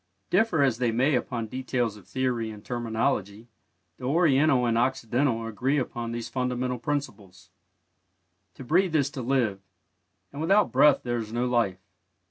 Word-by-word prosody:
Differ 180 -6 +3
as 125 -4 +1
they 120 -2 +1
may 130 +6 +2
upon 120 -2 -1
details 125 -2 -2
of 100 -4 -16
theory 120 0 -1
and 105 -1 -11
terminology, 110 -2 -2 0.5
the 125 - -8
Oriental 140 -3 +3
and 115 -1 +1
the 115 - +3
Occidental 120 -1 0
agree 125 +6 -1
upon 120 -3 -3
these 115 -1 -4
fundamental 125 0 -2
principles. 120 -8 -5 1.0
To - - -9
breathe 170 +5 +2
is 140 -2 +2
to 135 - -6
live, 120 -6 0 0.7
and 140 - -7
without 195 +6 +3
breath 140 +2 +5
there 120 -1 -1
is 110 -2 -5
no 120 +2 -1
life. 120 -7 +1
125 Hz, 155 wpm, -26 LUFS, 115-135 Hz, 1.0 s, breath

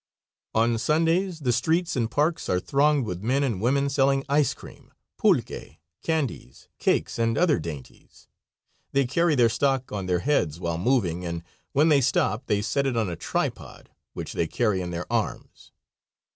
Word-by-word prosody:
On 115 +1 +2
Sundays 165 - +1
the 125 -3 +1
streets 165 +6 +1
and 115 -3 0
parks 150 +6 0
are 90 - +2
thronged 140 +4 +2
with 90 -3 -5
men 130 +6 +1
and 115 -9 -1
women 140 +4 +2
selling 135 0 +2
ice 145 -1 +2
cream, - - -14 0.3
pulque, - - 0 0.2
candies, 155 - -3
cakes, - - 0
and 115 0 +1
other 175 - +3
dainties. 75 -5 -10 0.7
They 140 -1 +3
carry 165 +5 +2
their 120 -3 +5
stock 130 +2 0
on 100 -3 -4
their 90 -1 +1
heads 90 - 0
while 85 -2 -2
moving, 90 -6 +1
and 85 -1 -4 0.3
when 150 +4 +4
they 145 -3 +5
stop 140 -1 0
they 105 0 +1
set 135 +5 0
it 125 -3 -1
on 110 -6 0
a - - -4
tripod, 85 - -4 0.2
which - - -6
they 85 - 0
carry 105 -1 0
in 90 - -4
their 85 0 -4
arms. - - -3
125 Hz, 170 wpm, -25 LUFS, 95-145 Hz, 0.7 s, their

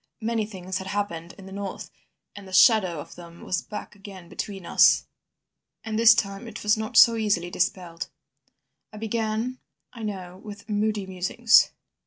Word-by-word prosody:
Many 225 -1 -1
things 185 -2 -5
had 190 - -7
happened 185 -4 -3
in 195 - -12
the 190 - -11
north, 200 0 -6 0.4
and 200 -1 -10
the 190 - -12
shadow 185 - +5
of - - -9
them 170 -1 -13
was 185 - -1
back 210 - -8
again 195 -3 -12
between 195 -1 -6
us, - - +5 0.8
and 220 0 -3
this 230 0 +8
time 200 +1 -3
it - - -8
was 210 0 +4
not 220 +2 -3
so 230 +2 +8
easily 200 -5 0
dispelled. 175 -4 -2 0.8
I 215 - -11
began 225 +3 -2 0.3
I 235 - -10
know 185 -4 -6
with 205 -1 -10
moody 210 -1 -1
musings. 190 +5 +3
200 Hz, 165 wpm, -25 LUFS, 185-220 Hz, 0.8 s, this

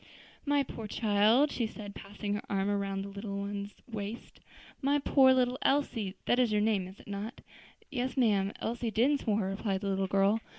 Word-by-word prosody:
"My 285 -1 +3
poor 225 -4 -7
child," 220 +7 +3
she 235 - -1
said, 210 -2 -8
passing 205 +1 -5
her 205 - -2
arm 195 0 0
around 195 -1 -1
the - - -6
little 200 0 -5
one's 200 0 -4
waist, 220 0 -6 0.4
"my 280 +1 +3
poor 270 -2 +5
little 255 0 +2
Elsie! 230 -8 +1
that 245 - +3
is 245 -3 +3
your 210 - +3
name, 210 -3 +1
is 190 +2 -13
it - - -16
not?" 205 +4 -5 0.5
"Yes, 255 0 -2
ma'am; 205 -6 +3
Elsie 235 0 -2
Dinsmore," 225 -2 +2
replied 195 0 -2
the 200 - -2
little 195 0 0
girl. 195 +3 +3
210 Hz, 180 wpm, -31 LUFS, 200-245 Hz, 0.5 s, poor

